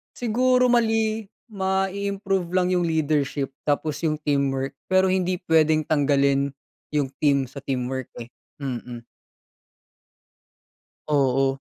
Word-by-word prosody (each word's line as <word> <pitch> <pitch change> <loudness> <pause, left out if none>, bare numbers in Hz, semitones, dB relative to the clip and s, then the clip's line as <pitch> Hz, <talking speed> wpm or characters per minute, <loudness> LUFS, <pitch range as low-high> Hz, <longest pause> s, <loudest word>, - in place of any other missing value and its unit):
Siguro 250 +2 +2
mali 225 -2 +1 0.2
mai-improve 195 -1 -1
lang 185 -1 +2
'yong 175 -2 +1
leadership 145 -3 0 0.2
tapos 150 +1 0
'yong 160 -2 0
teamwork, 135 -1 -1
pero 185 0 +3
hindi 185 -1 0
puwedeng 155 -2 +3
tanggalin 140 -2 +2 0.4
'yong 140 -3 +1
team, 140 -4 +2
sa 140 - -9
teamwork 130 -1 -3 0.2
eh, 120 - -13 0.3
mm. 120 -2 -5 2.0
Oo. 135 -2 +2
155 Hz, 100 wpm, -24 LUFS, 140-190 Hz, 2.0 s, pero